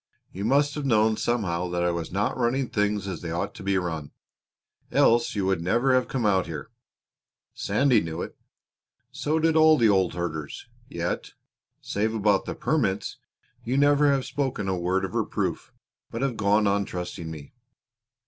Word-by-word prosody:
You 100 +3 -5
must 145 +4 +3
have 150 - -4
known 110 -4 +3
somehow 90 -8 -1
that 85 0 -1
I 90 - +2
was 85 -2 -4
not 100 +3 0
running 125 +1 0
things 105 -1 0
as 95 -4 -5
they 85 - -5
ought 85 +1 -3
to - - -11
be 100 0 +1
run, 80 -5 -3 0.8
else 120 0 +3
you 100 -2 0
would 95 -3 +1
never 120 +9 +2
have 130 -1 +2
come 125 -4 -2
out 95 -3 +2
here. 80 +6 -7 0.8
Sandy 140 -3 +2
knew 80 +1 -4
it - - -8 0.8
so 150 +3 -1
did 160 0 +2
all 155 0 +6
the 115 -3 +4
old 95 -4 +2
herders. 80 -4 -4 0.2
Yet, - - -3 0.5
save 110 +2 -1
about 105 -2 +2
the - - -4
permits, - - -1 0.5
you 125 +3 -1
never 145 0 +4
have 135 -2 0
spoken 130 -8 -2
a 95 - 0
word 90 +2 0
of 95 - -7
reproof, - - -2 0.4
but 115 +3 -4
have 135 -3 0
gone 105 0 +2
on 100 0 +2
trusting 90 -3 -6
me. 75 -3 -9
105 Hz, 175 wpm, -26 LUFS, 90-125 Hz, 0.8 s, all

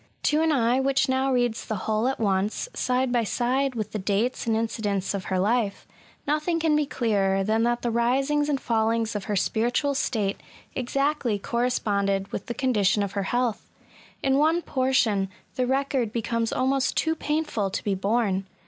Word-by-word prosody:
To 300 +1 +3
an 320 0 +3
eye 250 -2 +2
which 270 0 +2
now 265 +1 +1
reads 245 -3 0
the 220 - -3
whole 220 +2 +1
at 265 - -1
once, 200 -1 0
side 255 0 0
by 240 -1 +2
side 255 +4 0
with 215 -2 -3
the 215 - -3
dates 210 +6 -1
and 225 - +2
incidents 210 -4 -1
of 195 -2 -4
her 190 - -1
life, 205 +1 0 0.4
nothing 305 +3 0
can 320 -2 +2
be 300 -1 +1
clearer 195 -7 +1
than 220 +3 +1
that 240 0 0
the 240 - 0
risings 270 +6 +1
and 280 -2 +1
fallings 225 -1 0
of 205 - -3
her 210 - -1
spiritual 240 +8 +1
state 220 -7 -1 0.3
exactly 270 -2 0
corresponded 200 -4 0
with - - -5
the 235 - -4
con 260 -2 0
dition 205 -1 +2
of 200 - -3
her 200 - -2
health. 240 -3 -1 0.5
In 270 +1 +3
one 325 +3 +3
portion, 240 -7 +1 0.2
the 255 -1 -1
record 265 -3 0
becomes 230 0 -1
almost 265 +1 +1
too 320 - +2
painful 300 -11 -1
to - - -4
be 205 - 0
borne. 195 -1 0
235 Hz, 180 wpm, -25 LUFS, 210-265 Hz, 0.5 s, To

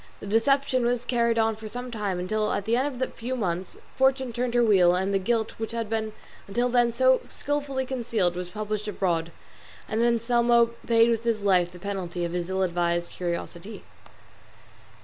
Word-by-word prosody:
The - - -9
deception 255 +4 +2
was 245 0 0
carried 235 -2 +1
on 225 -1 +2
for 220 0 -9
some 245 +3 -6
time, 205 -5 -2
until 210 +4 -1
at 200 - -2
the 225 +2 +2
end 260 +3 +1 0.2
of - - 0
a - - -15
few 250 +3 -4
months 185 -5 -3 0.2
Fortune 265 -2 +2
turned 245 +1 -2
her 240 - +5
wheel 185 -5 +5
and 190 +2 0
the 195 - +3
guilt 225 +2 0
which 225 0 -4
had 230 -2 -3
been 220 -1 -1 0.3
until 240 +5 0
then 240 -1 +3
so 260 +2 +3
skilfully 280 -2 -2
concealed 230 -9 -1
was 180 0 -5
published 215 +1 -4
abroad, 170 -5 -1 0.6
and 220 +1 -1
Anselmo 235 0 +3 0.2
paid 230 0 +5
with 230 0 -1
his 225 -3 0
life 180 -3 +3
the 180 - -12
penalty 180 -2 -4
of 170 - -4
his 175 0 -3
ill 190 0 0
advised 175 -1 0
curiosity. 175 +3 -5
220 Hz, 190 wpm, -26 LUFS, 190-240 Hz, 0.6 s, her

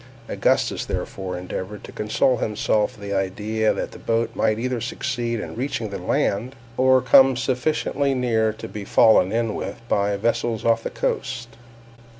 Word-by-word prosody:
Augustus - - +1
therefore 95 -2 -4
endeavored 95 +3 -6
to - - -10
console 110 +4 +1
himself 105 +2 0
with 100 -1 -8
the 100 - -2
idea 105 +3 0
that - - -3
the - - -11
boat 115 0 0
might 110 - +1
either 125 0 -2
succeed 120 -1 -2
in - - -6
reaching 115 -4 -3
the - - -4
land, 120 +7 -1 0.2
or 130 0 +4
come 135 -1 +6
sufficiently 135 +2 0
near 115 -3 +1
to 110 - -8
be 105 - -7
fallen 100 -1 +5
in 115 -1 0
with 100 +4 -5
by 100 -1 +1
vessels 115 +1 -1
off 115 0 +3
the - - -4
coast. 125 -3 -3
115 Hz, 160 wpm, -23 LUFS, 105-125 Hz, 0.2 s, come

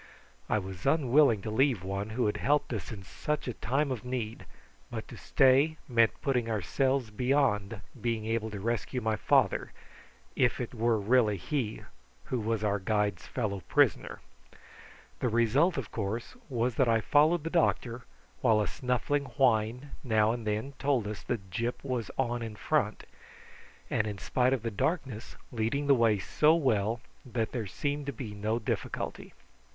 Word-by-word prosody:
I - - +3
was 95 -3 -5
unwilling 135 -7 +4
to 110 - -3
leave 125 -4 +2
one 100 +2 -3
who 120 +3 0
had 105 - 0
helped 145 -2 +1
us 105 -7 -4
in 100 -4 -7
such 150 +10 -3
a 125 - -2
time 135 +5 0
of 120 -5 -4
need; 125 -3 -4 0.4
but - - -6
to - - -9
stay 135 +4 +3
meant 115 -3 +3
putting 125 -4 +1
ourselves 125 - 0
beyond 115 -4 +1 0.2
being 115 -2 -1
able 110 0 -1
to 105 -2 -6
rescue 115 +4 -2
my 110 -2 0
father, - - +2 0.6
if 125 -2 +2
it 120 -1 -4
were 115 -1 +2
really 110 -1 +3
he 115 - -3 0.4
who 125 - -2
was 110 0 -1
our 105 -1 +1
guide's 105 -1 -1
fellow 105 -6 -2
prisoner. - - +2 1.0
The 125 - +1
result, 120 +10 +3
of 130 -6 -4
course, 110 +2 -4
was 125 -1 0
that 130 -3 +3
I 115 -1 +4
followed 150 +7 +3
the 165 - -4
doctor, 125 -8 +1 0.4
while 110 -1 +4
a 105 - +1
snuffling 135 +3 -1
whine 125 +1 +2
now 110 -4 +3
and 115 -2 -4
then 110 +6 -2
told 135 -6 +1
us 105 0 -5
that 95 -4 -4
Gyp 120 +3 -2
was 125 -6 -2
on 120 -2 0
in 110 -2 -5
front, - - 0 0.9
and, 110 - +1
in 105 -2 -4
spite 125 +6 +1
of 130 -4 0
the 115 - -2
darkness, 130 - -2 0.2
leading 120 +5 -1
the 140 - +6
way 115 -4 +4
so 150 - +3
well 115 -7 +1 0.2
that 120 -3 -2
there 115 -5 -3
seemed 145 +9 -3
to - - -1
be 120 -6 -7
no 105 +2 -1
difficulty. 115 - -4
115 Hz, 165 wpm, -30 LUFS, 110-130 Hz, 1.0 s, the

